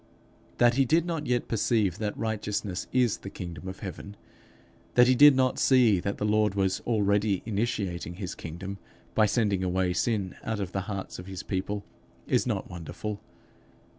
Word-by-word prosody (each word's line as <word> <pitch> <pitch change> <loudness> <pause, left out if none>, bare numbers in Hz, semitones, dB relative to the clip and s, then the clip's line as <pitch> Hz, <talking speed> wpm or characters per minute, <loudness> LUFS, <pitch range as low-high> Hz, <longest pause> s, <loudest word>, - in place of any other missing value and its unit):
That 120 0 +5
he 135 - +5
did 165 +6 +3
not 165 -5 -3
yet 120 -1 0
perceive 105 -4 +1
that 105 -1 -2
righteousness 105 -3 -2
is 125 -4 +2
the 100 - -7
kingdom 90 -1 -7
of 95 0 -7
heaven; 100 +1 -7 0.8
that 125 - +8
he 130 - +5
did 145 +2 +8
not 130 -1 +2
see 120 -8 +5
that 100 +3 -3
the 105 - -2
Lord 105 -1 +2
was 95 -1 +1
already 105 -3 +2
initiating 100 -6 -2
his 95 -1 -5
kingdom 95 +4 -7 0.3
by 110 -1 +4
sending 100 -4 +1
away 90 0 +1
sin 100 -1 -1
out 110 -1 -2
of 95 -2 -3
the 95 - -2
hearts 95 -3 -5
of 90 - -9
his 95 -1 -6
people, 100 +1 -3 0.4
is - - +1
not - - -2
wonderful. 95 +4 -6
105 Hz, 170 wpm, -28 LUFS, 95-115 Hz, 0.8 s, that